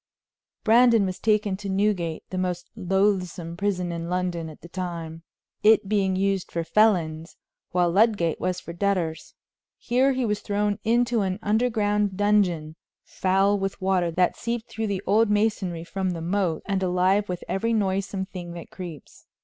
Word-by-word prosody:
Brandon 230 -2 +5
was 185 -1 -4
taken 210 -2 +1
to 200 0 -6
Newgate, 190 -4 0
the 185 - -3
most 180 -1 -3
loathsome 185 -4 0
prison 180 -2 -1
in 170 0 -4
London 180 -2 -2
at 155 - -13
that 170 - -14
time, 170 -3 -5 0.4
it 215 -2 +5
being 195 -2 +1
used 195 -1 0
for 170 - -2
felons, 165 -4 +1 0.3
while 175 -1 +2
Ludgate 200 -4 +2
was 180 0 -1
for 170 - -9
debtors. 175 -4 -2 0.4
Here 260 +3 +2
he 255 -1 -1
was 210 -2 0
thrown 205 0 -1
into 235 0 +2
an 190 -1 -1
underground 210 -3 +1
dungeon 180 -7 +1 0.3
foul 195 +2 +1
with 195 0 -3
water 185 -2 +1
that 180 +2 +1
seeped 235 0 -4
through 220 0 -2
the 200 -1 -2
old 215 +3 +3
masonry 205 -5 0
from 190 +1 -2
the 165 - -5
moat, 175 -1 -1
and 195 -1 -1
alive 185 +2 +2
with 180 -1 -4
every 225 +4 -1
noisome 195 -2 -1
thing 175 -3 -8
that 170 -1 -9
creeps. 175 -5 -10
190 Hz, 160 wpm, -25 LUFS, 175-210 Hz, 0.4 s, Brandon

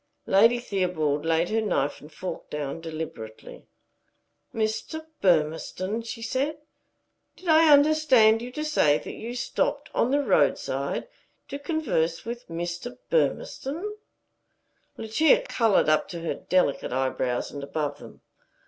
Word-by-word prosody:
Lady 230 +5 +5
Theobald 180 -10 -1
laid 165 +1 +2
her 225 +1 +1
knife 145 -9 -1
and 150 - -13
fork 185 +4 -6
down 150 +2 -4
deliberately. 155 -9 -8 0.8
"Mr. 225 +9 -3 0.2
Burmistone?" 180 +4 +1
she 230 0 -7
said. 275 +6 -1 0.8
"Did 370 - -13
I 315 -1 +6
understand 285 -7 +5
you 245 +1 -6
to 305 +2 -3
say 150 - +3
that - - -8
you 235 +2 -6
stopped 250 - -1
on 235 - +2
the 285 +2 +2
roadside - - +1 0.4
to 280 - -5
converse 285 - -1
with 235 +1 -6
Mr. 175 +7 -5
Burmistone?" 400 - -1 1.1
Lucia 315 - +3
colored 225 - +3
up 155 0 +2
to 170 -2 -6
her 165 - -2
delicate 180 -10 0
eyebrows 130 -1 -1
and 140 -1 -7
above 145 +1 -3
them. - - -13
215 Hz, 130 wpm, -26 LUFS, 160-265 Hz, 1.1 s, I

